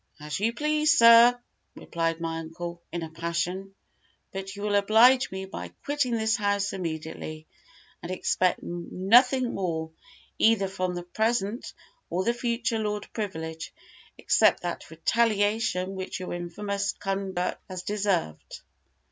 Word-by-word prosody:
"As 150 Hz, +3 st, -4 dB
you 220 Hz, +3 st, +1 dB
please, 305 Hz, +5 st, +2 dB
sir," 235 Hz, +1 st, +8 dB, 0.4 s
replied 165 Hz, 0 st, -2 dB
my 165 Hz, 0 st, -3 dB
uncle, 170 Hz, +1 st, -7 dB
in 170 Hz, 0 st, -3 dB
a 160 Hz, -, -7 dB
passion; 170 Hz, +4 st, -3 dB, 0.6 s
"but 195 Hz, 0 st, -6 dB
you 205 Hz, -, -7 dB
will 210 Hz, -1 st, 0 dB
oblige 225 Hz, +6 st, +5 dB
me 190 Hz, 0 st, -5 dB
by 190 Hz, -, -7 dB, 0.2 s
quitting 285 Hz, -4 st, 0 dB
this 220 Hz, -1 st, +1 dB
house 200 Hz, -1 st, 0 dB
immediately, 160 Hz, -3 st, -5 dB, 0.6 s
and 175 Hz, -, -6 dB
expect 185 Hz, 0 st, +1 dB
nothing 225 Hz, +9 st, +2 dB
more, 160 Hz, -4 st, -3 dB, 0.5 s
either 220 Hz, -3 st, +4 dB
from 185 Hz, -2 st, -3 dB
the 175 Hz, -, -5 dB
present 220 Hz, +4 st, -1 dB, 0.4 s
or 180 Hz, +2 st, -1 dB
the 235 Hz, -, +1 dB
future 235 Hz, -1 st, -1 dB
Lord 210 Hz, -1 st, -3 dB
Privilege, 160 Hz, -6 st, -5 dB, 0.5 s
except -, -, +3 dB
that -, -, -5 dB
retaliation 205 Hz, +1 st, +1 dB
which 190 Hz, -1 st, -5 dB
your 185 Hz, -, -5 dB
infamous 200 Hz, +3 st, -3 dB
conduct 195 Hz, -2 st, -3 dB
has 185 Hz, -1 st, -6 dB
deserved." 195 Hz, -, -2 dB
195 Hz, 130 wpm, -27 LUFS, 175-220 Hz, 0.6 s, sir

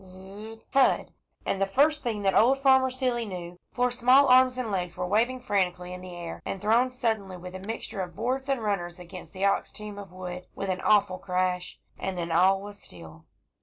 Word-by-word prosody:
Z 185 Hz, -1 st, -12 dB
z 200 Hz, +4 st, -9 dB
rr -, -, -19 dB
thud! 270 Hz, -1 st, +3 dB, 0.3 s
and 195 Hz, -, -1 dB
the 195 Hz, -, +3 dB
first 295 Hz, +8 st, +3 dB
thing 220 Hz, -4 st, -3 dB
that 195 Hz, -1 st, +2 dB
old 255 Hz, +4 st, +5 dB
Farmer 265 Hz, -1 st, +4 dB
Seeley 255 Hz, -2 st, -1 dB
knew, 180 Hz, -4 st, -7 dB
four 250 Hz, 0 st, +1 dB
small 255 Hz, +3 st, +5 dB
arms 255 Hz, 0 st, +6 dB
and 245 Hz, -4 st, -3 dB
legs 180 Hz, -3 st, -3 dB
were 180 Hz, -, -2 dB
waving 230 Hz, +7 st, +1 dB
frantically 180 Hz, -5 st, -1 dB
in 180 Hz, -, -8 dB
the 180 Hz, -1 st, -9 dB
air, 170 Hz, -1 st, -7 dB
and 195 Hz, -, -4 dB
thrown 230 Hz, +5 st, +3 dB
suddenly, 220 Hz, -7 st, -2 dB
with 180 Hz, +1 st, -9 dB
a 185 Hz, -, -6 dB
mixture 200 Hz, 0 st, -5 dB
of 175 Hz, -2 st, -6 dB
boards 260 Hz, +4 st, -2 dB
and 265 Hz, -4 st, 0 dB
runners, 175 Hz, -5 st, -2 dB
against 180 Hz, 0 st, -10 dB
the 195 Hz, 0 st, -2 dB
ox 200 Hz, -, +1 dB
team 210 Hz, -1 st, -8 dB
of 195 Hz, -3 st, -10 dB
wood, 180 Hz, 0 st, -7 dB
with 195 Hz, -, -4 dB
an 185 Hz, -, -3 dB
awful 200 Hz, -3 st, +3 dB
crash; 180 Hz, -1 st, -2 dB, 0.2 s
and 190 Hz, -1 st, -3 dB
then 170 Hz, -1 st, -3 dB
all 190 Hz, +4 st, +4 dB
was 205 Hz, 0 st, -10 dB
still. 80 Hz, -2 st, -13 dB
195 Hz, 215 wpm, -27 LUFS, 180-245 Hz, 0.3 s, arms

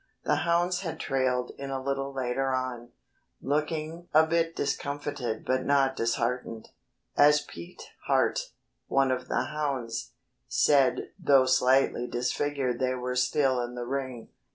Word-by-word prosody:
The -, -, +2 dB
hounds 175 Hz, +1 st, +1 dB
had 170 Hz, -4 st, -5 dB
trailed 130 Hz, -2 st, 0 dB
in 140 Hz, 0 st, -5 dB
a 135 Hz, -1 st, -2 dB
little 135 Hz, +1 st, -2 dB
later 130 Hz, 0 st, -1 dB
on, 125 Hz, -2 st, -4 dB, 0.5 s
looking 155 Hz, +4 st, -2 dB
a 160 Hz, +1 st, +7 dB
bit 165 Hz, 0 st, 0 dB
discomfited 140 Hz, -5 st, -3 dB
but 130 Hz, 0 st, +1 dB
not 135 Hz, -1 st, +2 dB
disheartened. 115 Hz, -1 st, -2 dB, 0.5 s
As 150 Hz, +1 st, +6 dB
Pete 85 Hz, 0 st, -11 dB, 0.2 s
Hart, -, -, +1 dB, 0.4 s
one 135 Hz, -1 st, +2 dB
of 130 Hz, 0 st, -2 dB
the -, -, 0 dB
hounds, 135 Hz, -7 st, -3 dB, 0.3 s
said 135 Hz, -4 st, +3 dB
"though 135 Hz, -2 st, +5 dB
slightly 130 Hz, -1 st, +3 dB
disfigured 125 Hz, +1 st, -1 dB
they 130 Hz, 0 st, 0 dB
were 125 Hz, 0 st, -3 dB
still 130 Hz, 0 st, +2 dB
in 120 Hz, 0 st, -5 dB
the 120 Hz, 0 st, -4 dB
ring." 130 Hz, -2 st, -4 dB
135 Hz, 135 wpm, -28 LUFS, 125-145 Hz, 0.5 s, a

